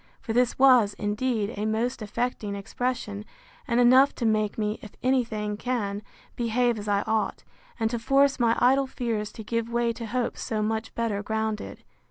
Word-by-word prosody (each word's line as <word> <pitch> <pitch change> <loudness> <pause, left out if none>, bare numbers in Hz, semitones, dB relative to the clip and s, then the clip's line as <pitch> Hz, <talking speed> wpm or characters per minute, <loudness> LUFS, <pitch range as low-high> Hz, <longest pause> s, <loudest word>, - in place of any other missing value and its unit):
For 225 - -4
this 245 +1 +2
was, 250 -6 +5
indeed, 210 +1 -1
a 210 +1 -2
most 230 +3 -1
affecting 215 -1 -3
expression, 210 0 -3 0.4
and 235 0 +2
enough 255 +3 +6
to 235 - -3
make 215 -2 +1
me, 210 0 -1
if 210 - -11
any 255 0 +3
thing 210 -2 -4
can, 210 -4 -2 0.3
behave 240 0 +1
as 205 - -7
I 200 0 +1
ought, 220 -1 -1 0.4
and 225 - +2
to 235 - -2
force 275 +3 +3
my 230 -1 +3
idle 270 +2 +3
fears 225 -5 -3
to 220 - -8
give 230 +1 -2
way 235 0 +1
to 230 0 -7
hopes 245 +1 -2
so 215 -1 -2
much 220 +1 -2
better 225 -3 -1
grounded. 220 0 -3
225 Hz, 180 wpm, -26 LUFS, 210-245 Hz, 0.4 s, enough